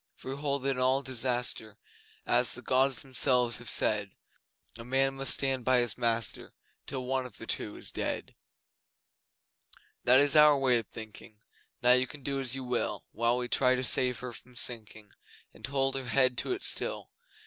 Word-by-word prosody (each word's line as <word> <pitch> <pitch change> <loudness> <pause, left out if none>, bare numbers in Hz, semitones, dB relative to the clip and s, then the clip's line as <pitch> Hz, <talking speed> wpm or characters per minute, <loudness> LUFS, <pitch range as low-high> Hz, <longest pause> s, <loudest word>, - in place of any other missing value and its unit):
For 130 - -8
we 140 - -10
hold 140 -2 -2
that 135 - +1
in 130 - -3
all 130 +2 +2
disaster 120 -4 -2 0.5
As - - +2
the - - -10
Gods 130 0 +1
Themselves 125 -2 +1
have 120 - -7
said 105 -2 +1 0.7
A - - -7
man 135 +2 +1
must 135 0 +1
stand 135 -2 -1
by 130 +1 +3
his 120 -3 0
master 115 -2 -1 0.3
Till 130 -2 -5
one 130 0 -1
of 120 - -9
the - - -8
two - - -4
is - - -5
dead. - - -4 1.7
That 125 +2 +6
is 145 +1 +4
our 150 -1 +7
way 130 -3 +3
of 115 - -8
thinking, 110 0 -11 0.5
Now 125 - +6
you 125 +1 +4
can 145 +2 -12
do 140 0 -2
as 130 -1 -2
you 135 - -5
will, 125 -1 -3
While 115 +2 +1
we 125 0 -3
try 130 0 +2
to 130 - -3
save 125 -1 +3
her 125 -1 -6
from 125 +2 -13
sinking, 110 -3 -2 0.4
And - - -8
hold 135 0 0
her 135 -2 -5
head 130 0 +2
to - - -2
it 375 - -6
still. - - 0
130 Hz, 190 wpm, -29 LUFS, 120-135 Hz, 1.7 s, our